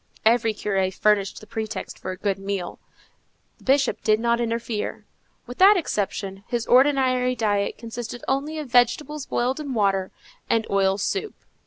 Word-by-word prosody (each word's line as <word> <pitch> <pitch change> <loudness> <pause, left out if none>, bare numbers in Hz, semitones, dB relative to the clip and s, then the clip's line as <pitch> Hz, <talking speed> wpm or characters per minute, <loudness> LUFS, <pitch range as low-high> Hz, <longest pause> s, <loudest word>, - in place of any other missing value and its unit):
Every 225 -1 +3
curé 195 -2 0
furnished 200 0 +1
the - - -11
pretext 220 -2 -5
for - - -6
a 185 - -4
good 195 0 -1
meal: 195 -2 -4 0.8
the - - -20
Bishop 270 +1 +2
did 215 0 +3
not 235 +1 +1
interfere. 230 -2 -3 0.4
With 245 - -10
that 395 +2 +8
exception, 195 - -3
his 240 -1 -2
ordinary 255 -1 +3
diet 205 -3 0
consisted 230 +1 -7
only 285 +4 -1
of 305 -2 -5
vegetables 265 +4 +1
boiled 255 +4 0
in 285 -4 -4
water, 195 -3 +1 0.4
and 225 -1 +2
oil 195 -1 +2
soup. 400 - -2
230 Hz, 155 wpm, -24 LUFS, 200-255 Hz, 0.8 s, that